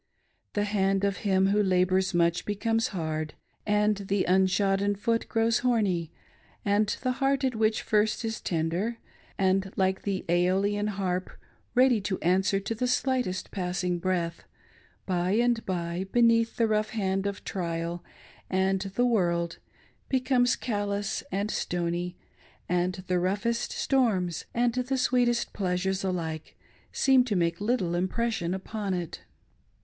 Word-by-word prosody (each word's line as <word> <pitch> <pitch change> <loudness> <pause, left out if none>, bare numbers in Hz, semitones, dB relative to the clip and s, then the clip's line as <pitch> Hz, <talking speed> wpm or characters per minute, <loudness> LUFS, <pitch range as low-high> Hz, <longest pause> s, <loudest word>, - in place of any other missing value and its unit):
The 205 - +1
hand' 195 -1 +1
of 200 0 +1
him 195 -1 +2
who 205 +1 +3
labors 185 -1 +2
miich 170 0 +2
becomes 225 +3 0
hard, 155 -5 -3 0.3
and 210 0 +2
the 195 0 -1
unshodden 195 +2 +2
foot 230 +3 -1
grows 225 0 +2
horny, 205 -10 +1 0.5
and 205 +1 +3 0.2
the 255 - +2
heart 275 0 +2
which 220 -1 +1
at - - -15
first 210 +2 +2
is 225 -1 -3
tender 175 +7 -1 0.4
and, 190 0 +1
like 190 0 +1
the 195 -2 -3
seolian 190 +4 +2
harp, 185 -2 -2 0.5
ready 250 -3 +5
to 195 -1 -2
answer 190 +3 +2
to 200 +3 -3
the 250 +3 -1
slightest 250 -6 0
passing 180 -2 -2
breath, 170 -2 -1 0.6
by 180 0 0
and 235 +1 +2
by, 175 0 -2
beneatih 230 -1 +3
the 230 - +2
rough 215 0 +1
hand 195 -3 -1
of 200 0 -5
trial 170 -1 -3 0.5
and 190 0 +1
the 245 - +3
world, 170 -7 +1 0.5
becomes 255 -1 +2
callous 205 -3 -2
and 200 +2 -1
stony, 175 0 -2 0.5
and 180 +1 0
the 180 -1 +1
roughest 205 +6 -1
storms 195 - +1
and 240 0 +2
the 255 +2 -1
sweetest 245 -2 +1
pleasures 190 0 -1
alike 165 -4 -3 0.3
seem 265 -2 +4
to 235 -5 -2
make 170 0 0
little 205 -6 0
impression 185 0 -1
upon 195 0 -3
it. 175 -3 -5
195 Hz, 135 wpm, -28 LUFS, 180-225 Hz, 0.6 s, ready